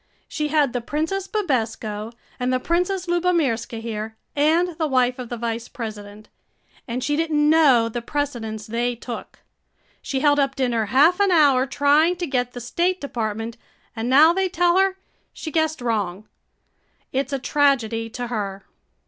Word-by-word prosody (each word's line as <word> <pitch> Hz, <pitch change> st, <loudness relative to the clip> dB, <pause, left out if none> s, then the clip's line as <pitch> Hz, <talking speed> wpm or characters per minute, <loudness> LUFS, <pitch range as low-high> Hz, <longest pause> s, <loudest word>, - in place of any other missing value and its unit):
"She 300 Hz, -1 st, -2 dB
had 295 Hz, -4 st, +2 dB
the 245 Hz, -, -1 dB
Princess 320 Hz, +10 st, -2 dB
Bibesco 225 Hz, -, -2 dB, 0.3 s
and 250 Hz, 0 st, 0 dB
the 255 Hz, -, +1 dB
Princess 360 Hz, +5 st, 0 dB
Lubomirska 330 Hz, -11 st, 0 dB
here 220 Hz, -1 st, -5 dB, 0.2 s
and 320 Hz, +5 st, +3 dB
the 315 Hz, -, +1 dB
wife 255 Hz, -2 st, +1 dB
of 245 Hz, -2 st, -6 dB
the 240 Hz, -, -4 dB
Vice 230 Hz, 0 st, -3 dB
President, 210 Hz, -2 st, -8 dB, 0.6 s
and 245 Hz, +1 st, -3 dB
she 290 Hz, +2 st, 0 dB
didn't 305 Hz, -2 st, +1 dB
know 285 Hz, -7 st, +5 dB
the 235 Hz, +1 st, -4 dB
precedence 235 Hz, -6 st, -3 dB
they 240 Hz, +2 st, -1 dB
took. 235 Hz, 0 st, -8 dB, 0.6 s
She 265 Hz, -1 st, -3 dB
held 290 Hz, 0 st, +4 dB
up 275 Hz, -1 st, +1 dB
dinner 240 Hz, -4 st, 0 dB
half 295 Hz, -, +4 dB
an 400 Hz, -1 st, +4 dB
hour 285 Hz, -6 st, +4 dB
trying 295 Hz, +6 st, +3 dB
to 355 Hz, 0 st, -3 dB
get 250 Hz, -4 st, -1 dB
the 245 Hz, -, -6 dB
State 345 Hz, +10 st, 0 dB
Department 225 Hz, -3 st, -4 dB, 0.4 s
and 225 Hz, +1 st, -3 dB
now 305 Hz, +6 st, +7 dB
they 380 Hz, +1 st, 0 dB
tell 350 Hz, +1 st, +3 dB
her 385 Hz, 0 st, +2 dB, 0.4 s
she 315 Hz, -, -7 dB
guessed 315 Hz, -2 st, 0 dB
wrong. 210 Hz, -4 st, -2 dB, 0.8 s
It 270 Hz, +1 st, -1 dB
's -, -, -6 dB
a -, -, +1 dB
tragedy 240 Hz, -5 st, +1 dB
to 245 Hz, +2 st, -5 dB
her." 200 Hz, -5 st, -4 dB
260 Hz, 165 wpm, -22 LUFS, 230-315 Hz, 0.8 s, now